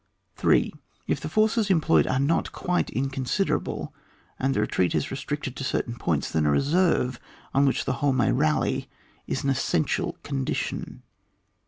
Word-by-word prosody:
3. - - +3 0.3
If - - -1
the - - -4
forces 215 0 +2
employed 150 - +4
are 130 - +1
not 145 +5 +1
quite 180 0 -1
inconsiderable, 135 +7 -1 0.5
and 135 +1 +1
the - - +2
retreat 90 -4 +1
is - - -1
re - - -2
stricted 140 -2 -4
to 135 - -6
certain 130 -2 -1
x>oint8, 120 - -1
then 80 -2 +1
a - - +4
reserve 140 - +2 0.3
on 140 +1 +4
which 135 - 0
the 130 - 0
whole 145 -1 +3
may 125 -6 +2
rally 75 -1 +1 0.4
is 135 - -2
an 140 - +2
es 135 - 0
sential 80 - 0
condition. 65 -1 -3
135 Hz, 165 wpm, -26 LUFS, 120-150 Hz, 0.5 s, employed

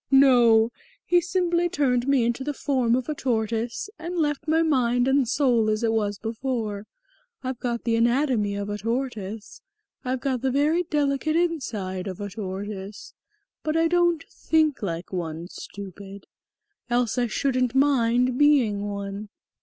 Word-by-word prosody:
No, 240 -4 +6 0.3
he 350 0 +4
simply 350 -1 +1
turned 255 -5 +1
me 275 -3 +3
into 240 +3 -1
the 290 +1 -3
form 255 -5 +1
of 255 -1 -2
a 305 - -1
tortoise 230 - -2
and 345 +2 -5
left 295 -1 -1
my 320 +1 +3
mind 250 -5 +2
and 270 -3 +2
soul 245 -6 +2
as 215 +2 0
it 225 - +2
was 205 -2 0
before. 220 -2 -3 0.6
I've 255 -1 -4
got 235 -2 -2
the 230 -1 +1
anatomy 235 -3 +2
of 200 0 -3
a 205 - -4
tortoise, 225 -3 -4 0.4
I've 255 0 -2
got 260 -3 -1
the 265 - +1
very 295 +6 +2
delicate 300 -2 0
inside 215 - -1
of 185 -2 -6
a 205 -1 -5
tortoise, 200 0 -6 0.5
but 310 +1 -1
I 330 0 +3
don't 345 -1 +2
think 310 -4 +1
like 175 -2 -4
one, 165 -1 -4
stupid. 200 0 -9 0.6
Else 245 0 +1
I 240 - +1
shouldn't 255 +1 0
mind 250 -2 +3
being 265 -9 +4
one." 200 +1 -5
245 Hz, 155 wpm, -25 LUFS, 215-285 Hz, 0.6 s, No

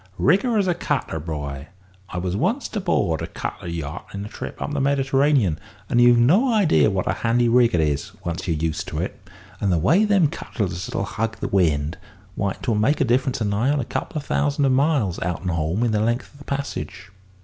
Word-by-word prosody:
Rig 175 +9 +4
her 240 -3 0
as 200 -2 +2
a 180 - +3
cutter, 135 - -2
boy. 75 -3 -5 0.4
I - - -6
was 90 +1 -2
once't 220 - -1
aboard 170 - 0
a - - -3
cutter - - -6
yacht 85 0 -5
in 100 +1 -4
a - - -7
trip - - -7
up 150 - -3
the 145 - 0
Mediterranean, 135 - +2 0.3
and 120 - +3
you've 120 0 +6
no 185 - +4
idea 200 - +4
what 95 -2 -1
a - - +2
handy 120 +1 +2
rig 120 -3 +4
it 85 - +3
is, 75 -2 -1
once 85 +1 -3
you're 80 -3 0
used 80 0 -2
to - - -5
it. - - -4 0.4
And 100 - +1
the 85 - +3
way 160 - +4
them 200 -6 +4
cutters 95 - -4
'll - - -2
hug 115 +2 -3
the - - -3
wind 80 -6 +1 0.3
why 100 -2 -1
't - - -11
would 105 -1 +1
make 140 +8 +2
a - - +3
difference 125 +1 +1
of 105 - +1
nigh 105 +6 +1
on 145 0 +2
a 125 - -2
couple - - -4
of 145 - -4
thousand 145 -1 +1
miles, 135 - +1
out 90 0 -2
and 90 - -1
home, 85 +6 0
in 120 - +2
the 105 - +1
length 120 +3 -1
of 140 - -18
the 140 - -13
passage." 135 -9 -5
115 Hz, 225 wpm, -23 LUFS, 90-140 Hz, 0.4 s, you've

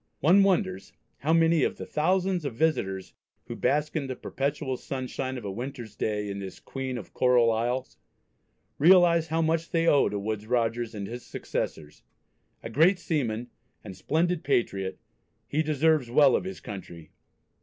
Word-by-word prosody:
One 180 +8 +5
wonders 170 - 0 0.3
how 150 +5 0
many 165 -1 +4
of - - 0
the - - -6
thousands 180 +2 0
of 140 -6 -4
visitors 95 -11 -1 0.3
who - - -6
bask 150 +2 0
in 145 -4 -1
the 130 - -4
perpetual 140 0 -3
sunshine 130 0 -4
of 120 - -8
a 100 - -3
winter's 120 -1 -7
day 105 -1 -2
in 100 0 -4
this 95 -1 -8
"Queen 130 -2 -5
of 105 - -9
Coral 125 -2 +4
Isles," 120 +3 -2 0.8
realise 170 0 +6
how 165 +1 0
much 165 +1 0
they 165 -1 +1
owe 145 -4 +4
to 105 - -3
Woodes 105 +1 -4
Rogers 115 -1 0
and 100 -1 -4
his 120 +4 -7
successors. 75 -1 -5 0.6
A - - -5
great 165 - +4
seaman 125 -8 -2 0.3
and 100 -4 -9
splendid 170 - 0
patriot 100 -8 0 0.5
he 150 - 0
deserves 155 -3 +2
well 135 +1 +5
of - - -1
his 190 - -6
country. 85 -5 -9
130 Hz, 165 wpm, -27 LUFS, 110-160 Hz, 0.8 s, realise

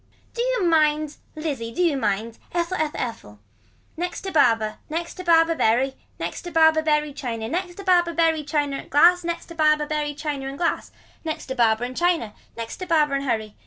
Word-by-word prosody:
Do 470 - -2
you - - +1
mind. 305 -2 +2 0.2
Lizzie 280 -7 -4
do 360 - 0
you 330 -5 +2
mind. 220 -1 -2
Ethel. 345 +1 -1
Ethel. 310 -1 -1
Ethel. 105 - -6 0.6
Next 355 +2 -4
to 385 - -5
barber. 225 -8 +3
Next 335 +2 -3
to 365 - -8
barber 330 -1 +4
bury. 260 -1 +2 0.3
Next - - -4
to 350 - -7
barber 320 -1 +5
bury 300 -1 +1
china. 235 -6 -4
Next 350 +6 -3
to 395 - -8
barber 350 -2 +3
bury 325 -2 +2
china 290 -1 -2
glass. 345 +5 +5
Next 340 0 -3
to - - -8
barber 305 -2 +3 0.3
china 290 -3 -4
and 270 +1 -6
glass. 335 +1 -1 0.3
Next 315 -2 -4
to 260 - -5
barber 230 -2 +3
and 250 +1 -4
china. 335 -11 +1 0.2
Next 230 -1 -5
to 370 - -6
barber 305 -4 +3
and 275 0 -1
hurry. 220 -4 -2
305 Hz, 195 wpm, -23 LUFS, 255-335 Hz, 0.6 s, barber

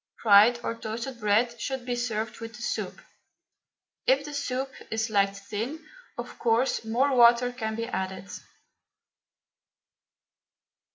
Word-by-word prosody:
Fried 220 +3 +7
or - - -1
toasted 230 +3 -6
bread 230 +3 +1
should 265 -2 -3
be 245 -1 -1
served 225 -2 -3
with 230 0 -8
the 240 - -11
soup. - - -3 1.1
If 275 +2 +3
the 295 - -7
soup 270 -1 -2 0.2
is 225 0 -1
liked 200 -1 +2
thin, 225 +10 -5 0.3
of - - -7
course 235 +2 +1
more 255 +5 +1
water 240 0 +6
can 220 -3 -3
be 230 +1 -3
added. 190 -4 -4
235 Hz, 125 wpm, -27 LUFS, 220-250 Hz, 1.1 s, Fried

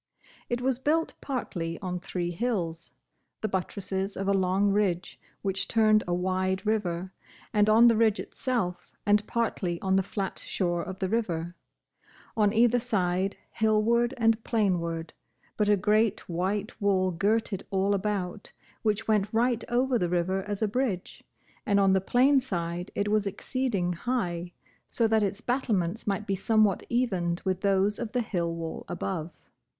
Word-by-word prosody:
It 240 0 -1
was 260 -1 0
built 320 +4 +1
partly 170 - -3
on 180 -1 -3
three 175 -1 -3
hills, 175 -5 -3 0.5
the 220 - 0
buttresses 190 0 -3
of 195 - -2
a 200 - +3
long 195 +1 +2
ridge 195 -3 0 0.2
which 195 0 -1
turned 215 -2 +4
a 175 - 0
wide 185 +2 -1
river, 190 -4 -1 0.4
and 210 0 +4
on 225 +2 +7
the 230 - +5
ridge 220 -1 +3
itself, 180 -9 -3
and 205 0 +4
partly 190 -7 -1
on 190 0 +1
the - - +4
flat 195 0 -4
shore 175 -2 -1
of 190 +2 -6
the 190 - -1
river, 175 -6 -2 0.8
on 210 -2 +3
either 240 +2 +4
side, 195 -5 0
hillward 230 +3 +2
and 225 -1 +2
plainward: 170 -7 0 0.4
but 210 -1 +1
a 205 - +5
great 215 +2 +2
white 195 +6 -2
wall 190 -2 +2
girt 205 +6 +1
it 195 - -3
all 195 +1 +1
about, 200 -1 -2 0.3
which 215 0 0
went 210 -2 +2
right 235 0 +1
over 250 +1 +2
the 175 - 0
river 180 +2 0
as 205 +1 -2
a - - +3
bridge, 210 -5 -2 0.4
and 200 -1 +2
on 195 -1 +4
the 190 - +3
plain 260 +8 +4
side 175 -6 -3
it 205 - 0
was 210 -1 +1
exceeding 200 -3 -1
high, 175 -5 -2 0.4
so 230 - +1
that 220 0 +3
its 200 +1 -1
battlements 225 -7 -1
might 205 +1 -1
be 195 - -1
somewhat 210 0 +2
evened 185 -8 0
with 185 -1 0
those 200 +1 +2
of 235 -1 -4
the 250 - +1
hill 175 -6 -1
wall 165 -1 -5
above. 175 -2 -3
200 Hz, 160 wpm, -28 LUFS, 180-225 Hz, 0.8 s, on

